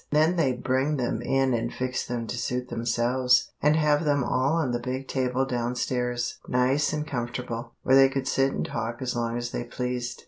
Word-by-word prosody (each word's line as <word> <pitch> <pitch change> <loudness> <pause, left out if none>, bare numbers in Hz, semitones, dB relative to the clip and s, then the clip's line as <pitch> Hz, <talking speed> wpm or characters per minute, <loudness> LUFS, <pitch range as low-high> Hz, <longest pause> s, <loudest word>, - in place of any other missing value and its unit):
Then 155 +4 +3
they'd 135 -7 0
bring 135 +3 +1
them 125 -2 -1
in 135 -1 +1
and 115 0 -1
fix 125 0 -2
them 120 -1 -3
to 120 - -4
suit 125 +1 -2
themselves, 120 +2 +2
and 150 +1 +4
have 150 -1 +3
them 145 -3 +2
all 130 +4 +1
on 160 -6 +1
the 120 - -1
big 130 +2 -4
table 130 0 0
down 120 -1 -2
stairs, 125 -1 -2
nice 130 +4 +2
and 150 -1 -2
comfortable, 120 -2 -4
where 130 - +4
they 135 0 +7
could 135 0 -3
sit 135 -1 +2
and - - -2
talk 115 +1 -4
as 125 -1 -2
long 120 0 -1
as 120 0 -4
they - - -3
pleased. 125 0 -4
125 Hz, 205 wpm, -26 LUFS, 120-135 Hz, -, they